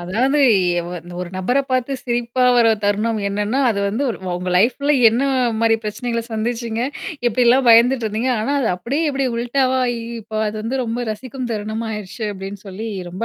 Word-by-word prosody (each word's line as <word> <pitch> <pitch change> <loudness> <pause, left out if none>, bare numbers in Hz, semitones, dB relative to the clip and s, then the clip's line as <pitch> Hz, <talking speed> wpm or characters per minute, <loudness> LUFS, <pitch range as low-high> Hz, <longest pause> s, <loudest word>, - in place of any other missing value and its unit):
அதாவது 250 +12 +1 0.5
ஒரு 180 0 -5 0.2
ஒரு 180 - -4
நபர 245 +9 +1
பார்த்து 255 +1 0
சிரிப்பா 240 +1 0
வர 230 -2 +5
தருணம் 210 +2 +1
என்னன்னா, 210 +6 -1
அது 200 - -2
வந்து 220 +8 -1 0.3
உங்க 180 +1 -3
லைஃப்ல 260 +8 +2 0.2
என்ன 235 +4 0 0.4
மாரி 225 -1 +4
பிரச்சனைகள 230 +2 -3
சந்திச்சீங்க? 230 +1 -2 0.5
எப்படிலாம் 245 +2 +3
பயந்துட்டுருந்தீங்க? 235 0 +4
ஆனா, 275 +6 -1
அது 235 - +1
அப்படியே 280 - -1
இப்படி 270 -1 -1
உல்டாவாயி 255 0 +1 0.2
இப்ப 215 0 -4
அது 210 - -6
வந்து 255 +3 -1
ரொம்ப 235 +2 -3
ரசிக்கும் 255 +3 -6
தருணமாயிருச்சு 215 0 -4
அப்படின்னு 195 +1 -7
சொல்லி 210 +4 -6 0.2
ரொம்ப 185 +6 -4
230 Hz, 150 wpm, -20 LUFS, 210-255 Hz, 0.5 s, வர